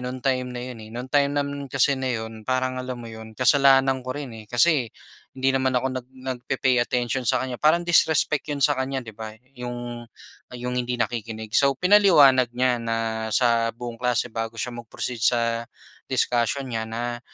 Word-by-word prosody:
no'ng 125 +1 -4
time 130 -1 0
na 125 - -4
yun 120 - -9
eh. 110 - -11
No'ng 125 +2 -5
time 140 -1 +3
naman 140 0 -3
kasi 135 +2 +3
na 130 -1 -2
'yon, 110 -1 -6
parang 130 0 0
alam 125 0 -4
mo 120 - -9
yun, 110 0 -10
kasalanan 135 0 +4
ko - - -3
rin 140 -4 -6
eh, 110 -1 -11
kasi 125 -2 +3 0.5
hindi 135 +1 +2
naman 130 0 +2
ako 130 - -2 0.2
nag - - -32
nagpe-pay 130 -1 -1
attention 125 +1 -1
sa 125 +1 +2
kanya, 125 -2 -6
parang 170 +3 +4
disrespect 155 -3 +3
'yon 145 - -2
sa 145 - +4
kanya 135 +1 -2
di 110 - -9
ba. 110 0 -7 0.2
Yung 120 -1 -6 0.6
yung 125 +1 -3
hindi 125 0 -2
nakikinig. 110 -2 -4
So, 140 -1 +4
pinaliwanag 165 - +6
niya 125 0 +1
na 115 -1 -2
sa 115 0 +2
buong 120 0 -8
klase 125 -1 0
bago 115 0 -4
siya 125 0 -3
mag-proceed 120 0 -6
sa, 115 0 +2 0.5
discussion 125 +1 0
niya 110 -1 -3
na, 120 +1 -4
125 Hz, 185 wpm, -24 LUFS, 115-135 Hz, 0.6 s, pinaliwanag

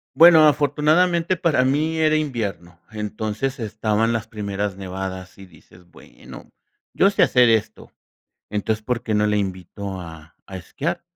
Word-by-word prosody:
Bueno, 160 -2 +8
afortunadamente 160 +5 +2
para 155 -8 +1
mí 155 +4 0
era 155 -1 +2
invierno, 105 - -4
entonces 110 +5 -4
estaban 110 +1 -1
las 115 0 -3
primeras 100 -2 -4
nevadas, 95 0 -7
y 95 - -12
dices: 90 0 -21
"Bueno, - - -15 0.4
yo 195 - +4
sé 200 - +2
hacer 125 -2 +4
esto. 110 -1 -1 0.6
Entonces, 105 +1 -2
¿por 125 -1 -2
qué 110 -3 -2
no 105 0 +2
la 105 0 +1
invito 95 0 -5
a 80 -2 -13
a 95 - -8
esquiar?" 150 - -4
110 Hz, 145 wpm, -21 LUFS, 100-150 Hz, 0.6 s, Bueno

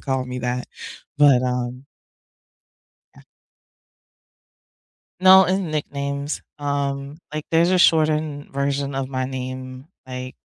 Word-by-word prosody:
call 130 -2 -1
me 125 0 -5
that. 125 0 -2 0.5
But, 140 -4 +6
um 125 +1 -3 1.3
Yeah. - - -16 2.0
No. 190 0 +8
And 185 -2 -1
nicknames, 140 -1 -3 0.2
um, 140 0 -3
like, 155 0 -4
there's 165 +2 +3
a 185 - +3
shortened 155 -3 +2
version 140 0 -1
of 135 -1 -2
my 130 -1 -2
name. 130 0 -6 0.2
Like 130 0 -6
140 Hz, 110 wpm, -22 LUFS, 130-150 Hz, 2.0 s, No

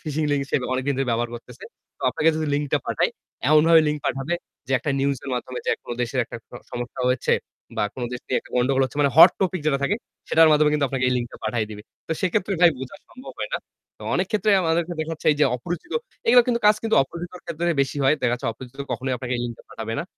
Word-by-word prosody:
Phishing 155 0 -1
link 140 -1 +1
সে - - +3 0.2
অনেকদিন 130 +2 0
ধরে 135 - 0
ব্যবহার 120 +1 0
করতেছে। 120 +1 -11 0.3
তো - - -13
আপনাকে 160 - +2
যদি 155 0 -1
লিংকটা 145 -1 0
পাঠায়, - - +1 0.4
এমনভাবে 160 +2 +7
লিংক 150 0 -1
পাঠাবে 135 +6 -1 0.3
যে - - -1
একটা 145 - -3
নিউজের 140 -1 -1
মাধ্যমে 125 0 -4
যে - - +2
কোনো 120 - -5
দেশের 120 +2 -3
একটা - - -8
স - - -35 0.2
সমস্যা 120 0 -5
হয়েছে 125 - +1 0.4
বা - - +1
কোনো 125 -2 -3
দেশ 125 - -4
নিয়ে 130 - +1
একটা - - -19
গন্ডগোল 135 +2 +2
হচ্ছে 145 - -6
মানে 140 -1 +3
হট 160 - +11
টপিক 185 -2 0
যেটা 140 -3 +2
থাকে 205 - +1 0.3
সেটার 160 0 +6
মাধ্যমে 150 0 +4
কিন্তু 150 -2 +2
আপনাকে 130 0 -1
এই 125 - +1
লিংকটা 120 -1 -5
পাঠায় 110 0 -1
দিবে। 105 0 -8 0.3
তো 160 - 0
সেক্ষেত্রে 185 +2 0
ভাই 175 -1 +8
বোঝা 130 +8 -7
সম্ভব 255 - -11
হয় - - -4
না। - - 0 0.4
তো - - -13
অনেক 185 +1 +1
ক্ষেত্রেই 210 -1 +3
আমাদেরকে 170 +1 0
দেখা 155 +1 -3
যাচ্ছে 160 - -7
এই - - -5
যে - - +7
অপরিচিত, 175 - -6 0.3
এগুলা 245 +1 +7
কিন্তু 240 -1 +1
কাজ 210 0 +6
কিন্তু 225 -1 +1
অপরিচিতের 175 +6 -8
ক্ষেত্রে 170 +2 -2
বেশি 135 - -4
হয়। 135 - +5
দেখা 120 - +2
যাচ্ছে 125 - -5
অপরিচিত 125 +3 -13
কখনোই 130 0 -2
আপনাকে 125 +1 -5
এই 120 - -3
লিংকটা 120 -1 -7
পাঠাবে 115 0 -5
না। - - -2
140 Hz, 235 wpm, -23 LUFS, 125-170 Hz, 0.4 s, হট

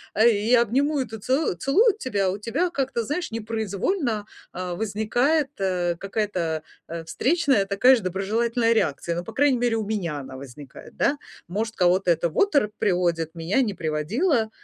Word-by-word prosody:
Э, 220 +3 +5
и 220 +2 +1
обнимуют 265 +1 0
и 220 - -4
целу 260 - 0
целую 375 - +3
тебя. 200 - 0
У 195 - -4
тебя 240 - -1
как-то, 270 -7 -2
знаешь, 300 +3 -3
непроизвольно, 220 - -2 0.3
э, 180 0 -4
возникает, 230 - +1
э, 180 -2 0
какая-то, 185 -6 -2 0.3
э, 165 0 -5
встречная, 275 - +2
такая 200 +7 +5
же 235 - -3
доброжелательная 230 +5 +1
реакция, 170 -4 0
ну, 175 - -3
по - - -9
крайней 280 -2 +3
мере, 240 -2 +1
у 220 -2 -2
меня 180 -8 -2
она 130 -1 -9
возникает, 135 0 -12
да. 285 - +2 0.3
Может 215 +5 -3
кого-то 180 0 +3
это 170 +1 +1
в - - -11
оторопь 285 - +3
приводит, 175 -5 0
меня 170 +10 +1
не 210 -5 0
приводило, 220 - 0
215 Hz, 165 wpm, -24 LUFS, 180-255 Hz, 0.3 s, Э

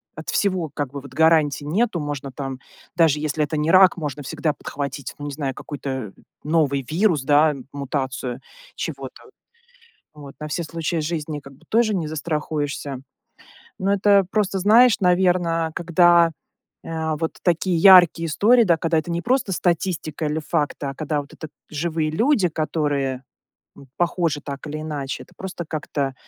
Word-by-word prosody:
от 155 - -8
всего 185 -5 0
как 145 -3 -3
бы 140 - -5
вот 135 -1 -12
гарантий 155 -2 +3
нету. 190 +4 0
Можно 145 -2 -5
там, 135 -1 -6 0.4
даже 160 -4 +3
если 150 0 -1
это 150 +2 -4
не 150 +2 +1
рак, 185 0 +6
можно 145 -3 -5
всегда 155 +2 -2
подхватить, 140 -2 -6
ну, 145 - -6
не 145 - -4
знаю, 135 -2 -3
какой-то 130 -7 -6 0.3
новый 150 -3 +1
вирус, 165 -4 +2
да, 150 +1 +4 0.2
мутацию 130 -3 -3 0.4
чего-то. - - -6 0.9
Вот. 140 -2 -11
На 150 - -5
все 155 +3 -2
случаи 165 +1 -3
жизни 155 -1 -3
как 140 0 -13
бы 135 - -22
тоже 225 -1 +2
не 165 -4 -2
застрахуешься. 150 -3 -3 0.8
Ну, 190 - 0
это 200 0 +4
просто 200 -3 0
знаешь, 225 +5 +5
наверно, 175 -3 +2
когда, 175 -1 +4 0.5
э, 160 -1 -2
вот 160 - -1
такие 175 +1 +1
яркие 175 -2 +7
истории, 230 +10 +4
да, 170 -6 +3
когда 165 0 +1
это 155 - -7
не 170 - -1
просто 250 -4 +1
статистика 170 -3 -1
или 150 +1 -1
факты, 150 -2 -2
а 135 - -4
когда 150 0 -2
вот 140 - -15
это 155 - -8 0.2
живые 155 0 -1
люди, 220 - +2
которые, 145 -4 -1 0.5
м, 140 - -14
похожи 170 -3 0
так 140 +1 -7
или 155 +1 -5
иначе, 145 -3 -4
это - - -24
просто 185 -2 -6
как-то 145 -3 -3
155 Hz, 160 wpm, -22 LUFS, 145-175 Hz, 0.9 s, яркие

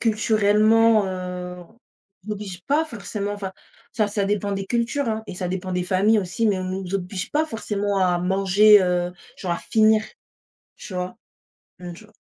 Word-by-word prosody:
culturellement, 215 0 +3
heu, 180 -1 -5 0.7
on - - -3
oblige 195 -3 -7
pas 300 +3 +2
forcément 205 - -5
enfin, 200 -2 -5 0.4
ça 215 -5 +1
ça 205 -1 -1
dépend 205 0 -1
des 195 0 -3
cultures, 240 +4 -1
hein, 220 0 -2
et - - -7
ça 180 0 -3
dépend 185 0 -4
des 180 0 0
familles 200 +4 +3
aussi, 200 +4 -1
mais 200 -3 +2
on 185 - -4
nous 185 0 -4
oblige 185 0 -4
pas 310 +2 +2
forcément 205 -5 -2
à 180 -1 +2
manger, 195 +3 +5
heu, 180 -1 0 0.3
genre 180 -3 -2
à 170 - -2
finir, 215 -1 +3 0.7
tu - - -10
vois? 180 0 -4 0.6
Mmh, 175 -1 -7
tu 195 - -14
vois. 215 - -20
200 Hz, 175 wpm, -23 LUFS, 185-215 Hz, 0.7 s, manger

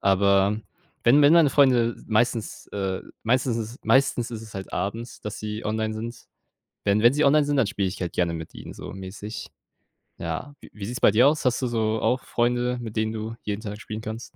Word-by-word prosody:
Aber 100 +1 +3 0.4
wenn 140 +5 +6
wenn 145 +2 +7
meine 165 -4 +6
Freunde 125 -5 +4
meistens 115 0 0
äh, 95 -2 -3 0.2
meistens 125 +1 +1
ist 115 +2 -6
meistens 130 -3 +3
ist 115 -2 -6
es 110 -2 -11
halt 95 -1 -7
abends, 115 +5 -4
dass 105 0 -5
sie 105 +1 -5
online 110 0 -1
sind. 115 +2 -7 0.6
Wenn 100 +1 +2
wenn 120 +3 +6
sie 150 +2 +2
online 150 +1 +5
sind, 145 0 0
dann 130 -6 +3
spiele 100 -3 -1
ich 95 - -6
halt 90 - -2
gerne 85 -2 +1
mit 80 -1 -7
ihnen - - -9
so - - -8
mäßig. 100 +3 -7 0.7
Ja, 85 - -4
w - - -13
wie 105 -2 -7
sieht's 125 +4 -5
bei - - +7
dir 120 +6 +6
aus? 150 +1 +1
Hast 125 -2 +2
du - - +1
so 110 -2 0
auch 130 - +1
Freunde, 120 +1 0
mit 110 -2 -7
denen 110 0 0
du 110 +1 -5
jeden 105 0 -4
Tag 105 0 -6
spielen 110 0 -6
kannst? 110 +1 -7
110 Hz, 215 wpm, -25 LUFS, 105-125 Hz, 0.7 s, wenn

